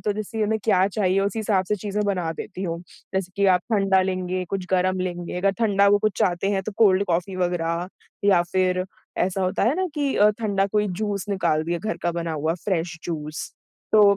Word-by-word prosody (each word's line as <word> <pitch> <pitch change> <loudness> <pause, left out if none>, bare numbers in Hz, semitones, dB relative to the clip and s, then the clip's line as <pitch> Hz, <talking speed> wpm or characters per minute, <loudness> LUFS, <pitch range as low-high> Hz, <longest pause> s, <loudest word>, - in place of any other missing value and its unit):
तो 210 - 0
जैसे 215 +1 -3
उन्हें 220 +1 0
क्या 190 -4 +4
चाहिए, 195 -1 +1
उसी 200 +2 -1
हिसाब 200 -3 +1
से 210 - +1
चीज़ें 205 +2 -2
बना 180 -5 0
देती 185 +3 -7
हूँ। 170 -2 -2 0.4
जैसे 185 -1 -1
कि 200 0 +3
आप 180 - +3
ठंडा 195 -2 +4
लेंगे? 185 -1 -2
कुछ 195 -2 -3
गरम 185 0 +2
लेंगे? 175 -1 -4
अगर 195 +2 +2
ठंडा 200 -3 +3
वो 205 0 +5
कुछ 215 -1 +1
चाहते 180 +2 +1
हैं 195 -1 0
तो 215 - -5
कोल्ड 200 -3 +5
कॉफ़ी 180 +1 -1
वग़ैरह 175 -1 -1 0.4
या 190 -4 +5
फिर 185 -1 +2 0.3
ऐसा 190 +1 0
होता 185 0 0
है 245 - +3
ना 375 - +1
कि 285 -3 0
अ, 210 +1 +6
ठंडा 200 -3 +1
कोई 210 -1 +2
जूस 200 +1 -2
निकाल 170 -6 +1
दिया, 170 +1 -1
घर 215 +4 -3
का 175 - 0
बना 170 -1 -3
हुआ 155 +1 0
फ्रेश 180 -3 -1
जूस, 155 -2 -5 0.4
तो 215 - +7
190 Hz, 210 wpm, -24 LUFS, 180-205 Hz, 0.4 s, तो